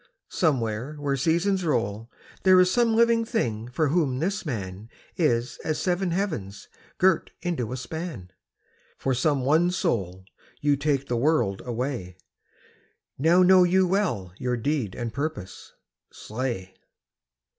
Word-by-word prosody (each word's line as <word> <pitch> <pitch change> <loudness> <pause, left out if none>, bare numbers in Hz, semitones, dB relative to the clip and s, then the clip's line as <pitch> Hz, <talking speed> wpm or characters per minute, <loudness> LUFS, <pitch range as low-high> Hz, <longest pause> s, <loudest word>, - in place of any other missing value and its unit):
somewhere 125 -3 0
where 145 -2 -1
seasons 170 +7 +1
roll 115 -7 -1 0.3
There 185 -1 +6
is 180 0 +4
some 235 0 +2
living 230 0 +4
thing 120 - -2
for 140 +4 0
whom 145 -5 +1
this 190 +5 -2
man 100 -4 -5 0.3
Is 125 -7 0
as 155 - -1
seven 180 0 0
heavens 155 - -3 0.3
girt 185 -2 +3
into 160 -11 -2
a 130 - -3
span, 130 - -6 0.7
For 135 - -1
some 140 +2 +1
one 160 +5 +4
soul 95 - -2 0.3
you 145 -1 +2
take 140 -1 0
the 120 - -1
world 120 -8 +1
away 120 -7 -4 1.0
Now 170 +5 +5
know 185 0 +7
you 185 +1 +3
well 175 - -1
your 125 -1 -1
deed 125 -5 -2
and 120 -2 -4
purpose. 140 -11 -5 0.4
Slay!' 110 -5 -5
140 Hz, 135 wpm, -25 LUFS, 115-175 Hz, 1.0 s, know